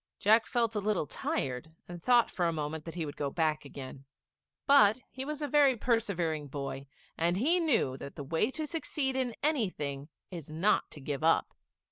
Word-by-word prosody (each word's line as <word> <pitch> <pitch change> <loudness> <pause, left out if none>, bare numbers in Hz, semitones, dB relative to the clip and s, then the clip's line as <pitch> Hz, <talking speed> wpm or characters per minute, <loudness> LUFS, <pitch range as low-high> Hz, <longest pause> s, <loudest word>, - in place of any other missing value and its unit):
Jack 220 +3 +4
felt 230 -2 +1
a 210 - 0
little 205 -5 0
tired, 135 +1 -3
and 175 -1 -8
thought 240 +4 +4
for 175 -3 0
a - - +1
moment 155 0 -4
that 165 - -7
he 165 -3 -2
would 145 - -7
go 145 -1 -2
back 155 -1 0
again; 135 -1 -9 0.6
but 220 -7 +6
he 260 - -5
was 300 +1 -4
a - - 0
very 280 -3 +4
persevering 180 -11 0
boy, 135 -1 -5 0.3
and 170 +2 +2
he 320 - +3
knew 250 - +2
that 140 - -9
the 145 - -6
way 165 - 0
to 310 +3 -4
succeed 295 -4 -2
in 255 -3 -1
anything 160 - -1 0.2
is 165 -5 -8
not 170 +7 +1
to - - -10
give 140 +2 -4
up. 165 - +3
175 Hz, 190 wpm, -31 LUFS, 150-245 Hz, 0.6 s, but